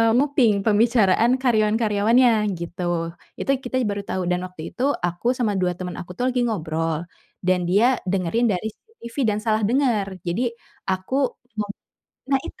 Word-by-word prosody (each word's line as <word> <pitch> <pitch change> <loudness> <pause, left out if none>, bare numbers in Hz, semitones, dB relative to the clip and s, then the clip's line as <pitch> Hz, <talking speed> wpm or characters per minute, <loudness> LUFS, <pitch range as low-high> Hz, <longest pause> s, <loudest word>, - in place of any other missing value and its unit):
nguping, 260 -5 +3
eee, 195 - -4
pembicaraan 225 0 +4
karyawan-karyawannya, 220 0 +3 0.3
gitu. 170 +1 -5 0.5
Itu - - -5 0.2
kita 245 - -3
ya - - 0
baru 200 0 -3
tau. 185 - -1
Dan 180 - +1
waktu 180 -3 -10
itu, 250 - -3 0.2
aku 175 +4 -5
sama 220 -5 +1
2 180 -1 +1
temen 180 -1 -5
aku 180 - -8
tuh 250 - 0
lagi 250 - +1
ngobrol, 165 -5 -2 0.4
dan 185 0 +3
dia 205 +6 +4 0.2
dengerin 195 +5 +1
dari 200 +3 -1
CCTV, 235 - -14
dan 205 - 0
salah 220 0 +2
denger. 230 -2 +2 0.2
Jadi, 175 +7 -1 0.5
aku 190 +6 -2 0.4
ngob 205 -1 -2 0.6
nah 270 -1 +2
itu. - - -12
210 Hz, 160 wpm, -23 LUFS, 185-240 Hz, 0.6 s, pembicaraan